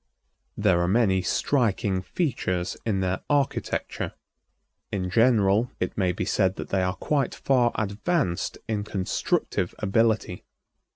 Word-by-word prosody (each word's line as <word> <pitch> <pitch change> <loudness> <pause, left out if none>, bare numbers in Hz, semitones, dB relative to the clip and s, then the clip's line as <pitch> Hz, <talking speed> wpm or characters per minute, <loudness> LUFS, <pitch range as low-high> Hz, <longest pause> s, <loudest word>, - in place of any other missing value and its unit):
There 85 -1 +3
are 85 - +1
many 95 -2 +3
striking 105 -6 +1
features 95 - -2
in 100 -3 +1
their 90 -1 -1
architecture. 145 -2 -1 0.8
In 90 -2 -2
general, 115 0 +4
it 90 - -2
may 95 -3 +1
be 90 - -3
said 95 -2 +1
that - - -7
they 95 - +1
are 90 +1 0
quite 140 -5 -1
far 125 -3 +2
advanced 110 - -1
in 105 -2 -1
constructive 95 -2 -1
ability. 110 -2 +1
100 Hz, 125 wpm, -26 LUFS, 95-120 Hz, 0.8 s, general